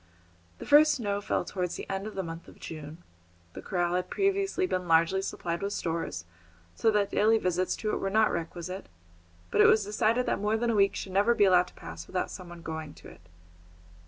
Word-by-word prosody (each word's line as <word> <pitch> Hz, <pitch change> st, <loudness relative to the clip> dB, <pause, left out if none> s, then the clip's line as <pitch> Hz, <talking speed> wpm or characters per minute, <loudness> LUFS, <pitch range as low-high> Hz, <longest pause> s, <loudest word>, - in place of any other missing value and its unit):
The -, -, -9 dB
first 300 Hz, +1 st, +6 dB
snow 205 Hz, -5 st, -2 dB
fell -, -, -1 dB
towards 180 Hz, -3 st, -3 dB
the -, -, -7 dB
end 195 Hz, +2 st, -3 dB
of 215 Hz, -, -8 dB
the 190 Hz, -, -2 dB
month 165 Hz, 0 st, -8 dB
of -, -, -15 dB
June. 155 Hz, +1 st, -9 dB, 0.5 s
The -, -, -8 dB
corral 175 Hz, -1 st, -1 dB
had 180 Hz, 0 st, -1 dB
previously 390 Hz, -1 st, +1 dB
been 185 Hz, -, -2 dB
largely 170 Hz, +4 st, +3 dB
supplied 170 Hz, -2 st, -4 dB
with 200 Hz, +1 st, -2 dB
stores, 160 Hz, -, -3 dB, 0.5 s
so 225 Hz, -, +2 dB
that 210 Hz, -2 st, +1 dB
daily 220 Hz, +2 st, +4 dB
visits 180 Hz, -2 st, 0 dB
to 215 Hz, -, -2 dB
it -, -, -1 dB
were 195 Hz, -, -1 dB
not 215 Hz, +2 st, +3 dB
requisite; 175 Hz, +3 st, -5 dB, 0.6 s
but -, -, +4 dB
it -, -, +8 dB
was 215 Hz, -2 st, +4 dB
decided 220 Hz, +4 st, +1 dB
that -, -, 0 dB
more 210 Hz, +2 st, +1 dB
than 235 Hz, +1 st, 0 dB
a -, -, 0 dB
week 200 Hz, -1 st, +3 dB
should 190 Hz, -, -5 dB
never 205 Hz, +5 st, +3 dB
be 205 Hz, -, +5 dB
allowed 180 Hz, -1 st, +5 dB
to -, -, -17 dB
pass 80 Hz, +1 st, -9 dB
without 185 Hz, -, -2 dB
some 180 Hz, -2 st, -9 dB
one 175 Hz, -1 st, -11 dB
going 160 Hz, -2 st, -6 dB
to -, -, -13 dB
it. 85 Hz, -, -16 dB
190 Hz, 215 wpm, -28 LUFS, 170-215 Hz, 0.6 s, it